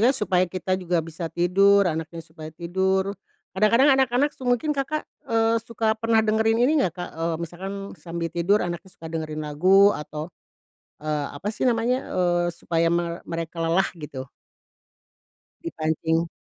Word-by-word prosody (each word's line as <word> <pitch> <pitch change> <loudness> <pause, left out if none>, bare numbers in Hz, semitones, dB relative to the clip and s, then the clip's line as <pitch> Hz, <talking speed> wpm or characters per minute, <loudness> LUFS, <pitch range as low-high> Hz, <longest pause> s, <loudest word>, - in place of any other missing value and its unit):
kan 270 - -1
supaya 185 -5 +2
kita 185 +1 -3
juga 175 -1 0
bisa 165 +1 -6
tidur 195 +4 +4
anaknya 165 -1 -3
supaya 155 -1 -10
tidur, 190 +4 0 0.4
kadang-kadang 230 +8 +5
anak-anak 265 +2 +2
se - - -28
mungkin 245 +5 +2
Kakak, 295 +2 -2 0.2
eee, 225 0 +2
suka 225 -1 -1
pernah 225 -1 +3
dengerin 220 +1 +2
ini 300 +3 +3
gak - - -14
Kak, - - -9
eee, 165 0 0
misalkan 180 +4 -7 0.3
sambil 170 -1 -4
tidur 180 +5 +2
anaknya 175 +2 -5
suka 165 -3 -11
dengerin 155 -1 -4
lagu 190 +7 +5
atau, 150 +2 -6 0.7
eee, 150 -1 -1
apa 160 +8 -6
sih 225 - -1
namanya, 245 +2 +1
eee, 175 -1 +1
supaya 165 -1 0
me 170 0 0
mereka 165 0 -5
lelah 165 +3 +2
gitu? 140 -3 -6 1.4
Dipancing. 160 - -1
180 Hz, 150 wpm, -24 LUFS, 165-220 Hz, 1.4 s, kadang-kadang